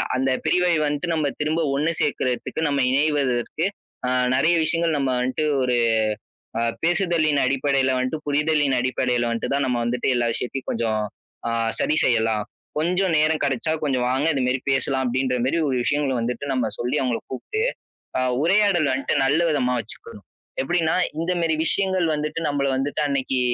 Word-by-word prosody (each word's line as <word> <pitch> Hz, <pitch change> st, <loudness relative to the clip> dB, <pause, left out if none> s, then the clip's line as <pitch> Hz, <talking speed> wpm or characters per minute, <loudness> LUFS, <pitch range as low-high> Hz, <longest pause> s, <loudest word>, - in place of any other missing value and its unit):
அந்த 130 Hz, +1 st, +1 dB, 0.2 s
பிரிவை 180 Hz, -1 st, +3 dB
வந்துட்டு 145 Hz, +4 st, -2 dB
நம்ம 155 Hz, -2 st, 0 dB
திரும்ப 155 Hz, +2 st, 0 dB
ஒண்ணு 150 Hz, +4 st, +1 dB
சேர்க்கறதுக்கு, 130 Hz, 0 st, -1 dB
நம்ம 140 Hz, -1 st, 0 dB
இணைவதற்கு, 140 Hz, 0 st, +1 dB, 0.4 s
ஆ -, -, 0 dB, 0.3 s
நெறைய 170 Hz, +5 st, +3 dB
விஷயங்கள் 165 Hz, 0 st, +1 dB
நம்ம 135 Hz, -2 st, 0 dB
வன்ட்டு 130 Hz, +5 st, -1 dB, 0.2 s
ஒரு 125 Hz, -1 st, +1 dB, 0.8 s
அ -, -, 0 dB, 0.2 s
பேசுதலின் 165 Hz, -4 st, +2 dB
அடிப்படையில 135 Hz, 0 st, +1 dB
வன்ட்டு, 130 Hz, +5 st, -1 dB
புரிதலின் 145 Hz, -1 st, +2 dB
அடிப்படையில 125 Hz, -1 st, 0 dB
வன்ட்டு 115 Hz, -, -3 dB
தான் 140 Hz, -1 st, +1 dB
நம்ம 125 Hz, -1 st, 0 dB
வந்துட்டு 120 Hz, +1 st, -1 dB
எல்லா 120 Hz, -1 st, +1 dB
விஷயத்தையும் 130 Hz, +3 st, -4 dB
கொஞ்சம் 110 Hz, -2 st, -1 dB, 0.5 s
ஆ -, -, -1 dB, 0.3 s
சரி 155 Hz, -, +1 dB
செய்யலாம். 110 Hz, -3 st, +2 dB, 0.4 s
"கொஞ்சம் 180 Hz, +2 st, +1 dB
நேரம் 155 Hz, +1 st, +2 dB
கெடைச்சா, 140 Hz, +3 st, 0 dB
கொஞ்சம் 130 Hz, -4 st, 0 dB
வாங்க 135 Hz, +3 st, 0 dB
இதுமாரி 130 Hz, -1 st, 0 dB
பேசலாம்." 135 Hz, 0 st, 0 dB
அப்படின்ற 125 Hz, +1 st, 0 dB
மாரி 150 Hz, +6 st, +1 dB
ஒரு 130 Hz, -, 0 dB
விஷயங்கள 145 Hz, -1 st, 0 dB
வந்துட்டு 125 Hz, +4 st, -3 dB
நம்ம 130 Hz, -, 0 dB
சொல்லி 125 Hz, +5 st, -1 dB
அவங்கள 125 Hz, -3 st, 0 dB
கூப்ட்டு, 420 Hz, -, -3 dB, 0.6 s
அ -, -, +1 dB, 0.2 s
உரையாடல் 185 Hz, -4 st, +3 dB
வன்ட்டு 130 Hz, 0 st, -1 dB
நல்ல 140 Hz, +3 st, +3 dB
விதமா 125 Hz, -5 st, +1 dB
வச்சுக்கணும். 110 Hz, -2 st, -10 dB, 0.4 s
எப்படின்னா, 160 Hz, +3 st, +1 dB, 0.2 s
"இந்த 165 Hz, +2 st, -1 dB
மேரி 160 Hz, -1 st, +1 dB
விஷயங்கள் 190 Hz, -1 st, +1 dB
வந்துட்டு 150 Hz, +2 st, -3 dB
நம்பள 145 Hz, -1 st, 0 dB
வந்துட்டு 145 Hz, +3 st, -2 dB
அன்னைக்கு 135 Hz, -2 st, 0 dB
140 Hz, 155 wpm, -23 LUFS, 125-155 Hz, 0.8 s, பிரிவை